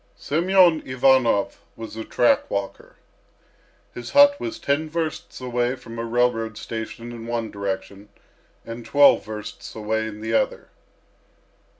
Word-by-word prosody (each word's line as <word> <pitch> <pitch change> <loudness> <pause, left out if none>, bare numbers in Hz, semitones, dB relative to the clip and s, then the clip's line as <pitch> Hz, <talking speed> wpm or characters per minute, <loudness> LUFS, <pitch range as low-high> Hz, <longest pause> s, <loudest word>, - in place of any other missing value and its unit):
Semyon 175 +1 +3
Ivanov 130 -5 +2 0.2
was 115 -1 -8
a 110 - -5
track 120 - +2
walker. 100 -1 -5 1.0
His 120 - -7
hut 285 0 +6
was 335 -2 -4
ten 155 - -1
versts 160 0 -4
away 125 0 -1
from 115 -2 -10
a - - -2
railroad 115 -2 0
station 115 +1 -6
in 115 -1 -8
one 115 -2 -3
direction 100 0 -5 0.6
and 115 +1 -7
twelve 145 +4 +5
versts 105 -1 -8
away 110 0 -2
in 105 -1 -8
the 110 +1 -3
other. - - 0
115 Hz, 130 wpm, -23 LUFS, 110-140 Hz, 1.0 s, hut